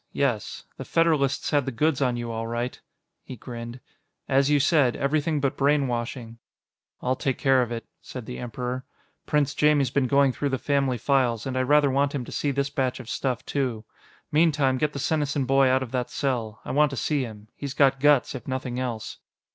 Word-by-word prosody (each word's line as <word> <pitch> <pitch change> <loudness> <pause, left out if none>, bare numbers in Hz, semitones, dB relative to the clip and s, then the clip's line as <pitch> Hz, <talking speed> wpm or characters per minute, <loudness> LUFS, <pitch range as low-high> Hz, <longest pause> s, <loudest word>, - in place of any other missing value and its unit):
Yes. 125 -7 -1
The - - -5
Federalists 155 -5 +1
had 145 -3 +2
the - - -1
goods 145 +3 +1
on 125 -3 +1
you, 120 -1 -4
all 115 0 -3
right." 120 +2 -3 0.4
He 130 - -8
grinned. 120 +1 -8 0.5
"As 135 +1 +3
you 145 -1 +4
said, 140 -3 +3
everything 150 +2 0
but 140 -1 0
brainwashing." 125 -4 -1 0.6
"I'll 130 +1 +1
take 135 0 -1
care 135 -1 +3
of 120 -1 -2
it," 115 -1 -4 0.2
said 125 -3 -8
the 125 - -7
Emperor. 125 +2 -4 0.4
"Prince 150 -1 +1
Jaimie's 145 -4 +3
been 135 -1 +1
going 140 0 +4
through 145 - -2
the 135 - -1
family 135 -2 0
files, 120 -3 +1
and 130 -1 -3
I 130 - +1
rather 145 +1 +4
want 140 +2 +1
him 130 -3 -3
to - - -10
see 145 - -1
this 140 0 -1
batch 130 -2 -1
of 125 -3 -9
stuff, 130 -3 -2
too. 125 -6 -2 0.5
Meantime, 150 -4 +3
get 150 -1 0
the - - -5
Senesin 145 -1 0
boy 135 +1 +4
out 130 +1 +2
of 120 - -8
that 125 -2 -2
cell; 120 -6 -2
I - - -4
want 150 +1 +4
to 135 - -6
see 150 +2 0
him. 110 -3 -8
He's 140 -1 -6
got 135 -1 +4
guts, 145 -1 +4
if 130 - -8
nothing 130 -1 -3
else." 120 -4 -4
135 Hz, 205 wpm, -25 LUFS, 125-140 Hz, 0.6 s, you